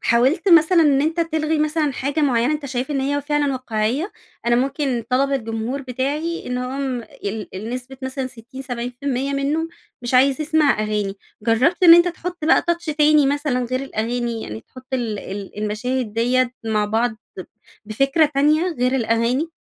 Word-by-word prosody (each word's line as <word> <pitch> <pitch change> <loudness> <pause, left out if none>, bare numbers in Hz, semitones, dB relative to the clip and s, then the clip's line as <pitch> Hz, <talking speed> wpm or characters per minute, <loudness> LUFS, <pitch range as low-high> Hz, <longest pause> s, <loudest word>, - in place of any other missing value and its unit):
حاولت 265 +11 +2
مثلًا 335 +1 +6
إن 285 -3 +4
أنتَ 325 +2 0
تلغي 315 -1 0
مثلًا 305 -1 +1
حاجة 280 +4 -2
معيّنة 255 0 +2
أنتَ 295 -2 -3
شايف 260 +2 -3
إن 275 - 0
هي 285 +2 0
فعلًا 290 -1 0
واقعيّة؟ 255 - -2 0.3
أنا 240 0 +4
ممكن 270 -2 -1
طلب 275 +2 +2
الجمهور 230 +2 -3
بتاعي 280 +7 -3
إنهم 250 0 -3
ال 210 -1 -6
النسبة 250 +6 -6
مثلًا 260 0 -3
60 255 +2 -10
70% 250 +2 -3
منّه 295 +4 -1 0.3
مش 240 +1 -3
عايز 270 +3 +4
يسمع 305 -5 +2
أغاني، 210 -2 -2 0.3
جرّبت 255 - +2
إن 335 -1 +10
أنتَ 345 +1 +5
تحط 350 -1 -6
بقى 320 - +4
touch 340 -3 -2
تاني 300 -1 +4
مثلًا 280 -3 0
غير 255 +2 -2
الأغاني، 235 -2 -3
يعني 110 +1 -7
تحط 255 - -15
ال 230 -5 -1
ال 200 +1 -7
المشاهد 220 +2 -2
دِيَّة 250 +2 +2
مع 215 -1 +1
بعض 225 +3 +1 0.3
ب - - -5 0.4
بفكرة 275 +8 +2
تانية 300 +4 +3 0.2
غير 250 +1 +1
الأغاني؟ 235 +6 +1
260 Hz, 160 wpm, -21 LUFS, 235-295 Hz, 0.4 s, إن